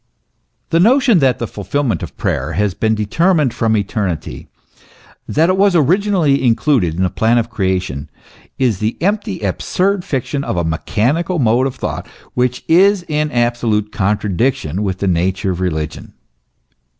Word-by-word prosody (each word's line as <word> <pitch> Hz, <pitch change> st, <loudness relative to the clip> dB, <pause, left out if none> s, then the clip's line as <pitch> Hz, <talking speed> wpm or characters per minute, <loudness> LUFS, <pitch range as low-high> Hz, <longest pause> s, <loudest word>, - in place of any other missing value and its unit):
The 165 Hz, -, +3 dB
notion 240 Hz, 0 st, +4 dB
that 130 Hz, -5 st, +2 dB
the 120 Hz, -, -3 dB
fulfilment 115 Hz, +5 st, -2 dB
of -, -, -8 dB
prayer 75 Hz, +6 st, -2 dB
has 105 Hz, 0 st, 0 dB
been 110 Hz, +3 st, 0 dB
deter 165 Hz, -, +1 dB
mined 145 Hz, -7 st, +1 dB
from 110 Hz, -1 st, +1 dB
eternity, 100 Hz, -5 st, -3 dB, 0.8 s
that 160 Hz, +3 st, +2 dB
it 185 Hz, +1 st, +1 dB
was 195 Hz, -1 st, +3 dB
originally 170 Hz, -3 st, +2 dB
included 115 Hz, -, +2 dB
in 95 Hz, -, 0 dB
the 90 Hz, -, +1 dB
plan 115 Hz, +2 st, +2 dB
of 115 Hz, 0 st, -1 dB
creation, 95 Hz, -, -2 dB, 0.5 s
is 120 Hz, -8 st, +1 dB
the 110 Hz, +2 st, -2 dB
empty, 200 Hz, -, -1 dB
absurd 180 Hz, -, -1 dB
fiction 140 Hz, -4 st, -2 dB
of 95 Hz, -, -3 dB
a 85 Hz, -, +1 dB
mechanical 125 Hz, -, -1 dB
mode 125 Hz, -1 st, +2 dB
of 130 Hz, -, -6 dB
thought, -, -, -5 dB, 0.3 s
which 125 Hz, 0 st, -1 dB
is 190 Hz, +2 st, +4 dB
in 150 Hz, -1 st, -1 dB
absolute 120 Hz, -4 st, 0 dB
contradiction 105 Hz, -, -1 dB
with 95 Hz, -3 st, -2 dB
the 100 Hz, -, -2 dB
nature 95 Hz, +2 st, 0 dB
of 90 Hz, 0 st, -4 dB
religion. 80 Hz, -4 st, -4 dB
115 Hz, 155 wpm, -17 LUFS, 95-155 Hz, 0.8 s, notion